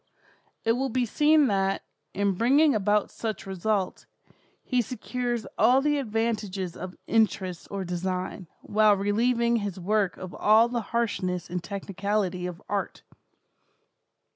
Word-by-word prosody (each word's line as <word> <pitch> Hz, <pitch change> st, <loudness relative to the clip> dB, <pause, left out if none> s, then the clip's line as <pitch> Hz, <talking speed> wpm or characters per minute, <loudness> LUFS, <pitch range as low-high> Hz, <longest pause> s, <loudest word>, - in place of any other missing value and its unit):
It 225 Hz, -, +4 dB
will 265 Hz, +3 st, 0 dB
be 250 Hz, +1 st, 0 dB
seen 300 Hz, +5 st, +4 dB
that, 195 Hz, -4 st, 0 dB, 0.3 s
in 200 Hz, 0 st, +1 dB
bringing 275 Hz, -, +4 dB
about 210 Hz, -1 st, +1 dB
such 220 Hz, -3 st, -4 dB
result, 195 Hz, 0 st, -2 dB, 0.6 s
he 250 Hz, -2 st, +1 dB
secures 240 Hz, -1 st, -3 dB
all 255 Hz, +2 st, +6 dB
the 295 Hz, +1 st, +1 dB
advantages 210 Hz, -6 st, -2 dB
of 185 Hz, 0 st, -8 dB
interest 195 Hz, -5 st, 0 dB
or 195 Hz, -1 st, -4 dB
design, 180 Hz, +1 st, -3 dB, 0.2 s
while 210 Hz, 0 st, +4 dB
relieving 235 Hz, +4 st, +2 dB
his 200 Hz, -4 st, -4 dB
work 200 Hz, 0 st, 0 dB
of 185 Hz, -1 st, -8 dB
all 220 Hz, +3 st, +4 dB
the 240 Hz, -1 st, -1 dB
harshness 185 Hz, -7 st, -1 dB
and 180 Hz, -1 st, -3 dB
technicality 195 Hz, -1 st, -2 dB
of 180 Hz, +2 st, -8 dB
Art. 200 Hz, -1 st, -3 dB
210 Hz, 130 wpm, -27 LUFS, 190-235 Hz, 0.6 s, all